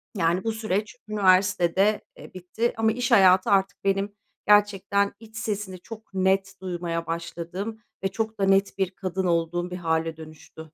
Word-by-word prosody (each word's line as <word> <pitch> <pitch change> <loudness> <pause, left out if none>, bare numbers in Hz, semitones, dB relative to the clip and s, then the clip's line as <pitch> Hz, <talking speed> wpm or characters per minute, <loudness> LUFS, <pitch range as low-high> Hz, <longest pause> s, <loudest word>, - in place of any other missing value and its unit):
Yani, 175 0 +1
bu 225 - 0
süreç 215 -1 -2
üniversitede, 190 0 +3 0.2
eee, - - -13
bitti 185 +6 -2
ama 225 0 +3
iş 245 +2 -2
hayatı 190 -4 +6
artık 195 -2 +1
benim 195 +1 0 0.3
gerçekten 200 -1 +3
iç 220 0 -13
sesimi 205 -4 -4
çok 220 +2 -12
net 190 +1 +1
duymaya 175 -2 -3
başladığım 170 +6 -5 0.2
ve - - +2
çok 220 +3 -4
da 195 - +1
net 195 +1 +2
bir 190 -2 0
kadın 190 0 -3
olduğum 175 +1 0
bir 180 - -4
hâle 160 -2 -1
dönüştü. 155 0 -13
190 Hz, 155 wpm, -25 LUFS, 175-210 Hz, 0.3 s, hayatı